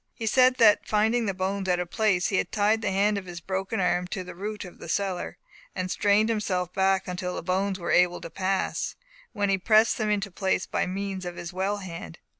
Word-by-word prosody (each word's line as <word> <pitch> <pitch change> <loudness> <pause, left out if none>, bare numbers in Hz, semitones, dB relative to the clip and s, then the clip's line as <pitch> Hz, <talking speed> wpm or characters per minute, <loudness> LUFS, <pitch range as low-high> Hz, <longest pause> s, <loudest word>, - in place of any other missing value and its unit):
He 225 - -5
said 255 +3 +5
that 225 -4 +5
finding 220 +2 +2
the 195 - 0
bones 190 0 -2
out 180 - +3
of 180 -1 -4
place, 200 -5 +2
he 195 - +1
had - - -1
tied 215 +1 +2
the - - 0
hand 200 +2 +2
of 185 - -12
his 175 -1 -7
broken 195 +4 -3
arm 180 -1 +1
to 185 +1 -4
a - - -7
root 205 +3 -5
of 180 - -12
the - - -9
cedar, 190 -1 -2 0.4
and 185 -1 -3
strained 205 +1 +3
himself 185 -5 -1
back 190 0 +2
until 180 0 -3
the - - -5
bones 190 +2 0
were 175 - -3
able 180 0 +3
to 165 - -8
pass, 190 0 -1 0.4
when 205 -1 0
he 195 - +1
pressed 220 +5 +4
them 215 -1 0
into 205 -1 -1
place 190 0 0
by - - -1
means 195 0 -4
of 175 -1 -5
his 175 +1 -7
well 195 +3 -1
hand. 170 - -8
195 Hz, 230 wpm, -26 LUFS, 180-210 Hz, 0.4 s, said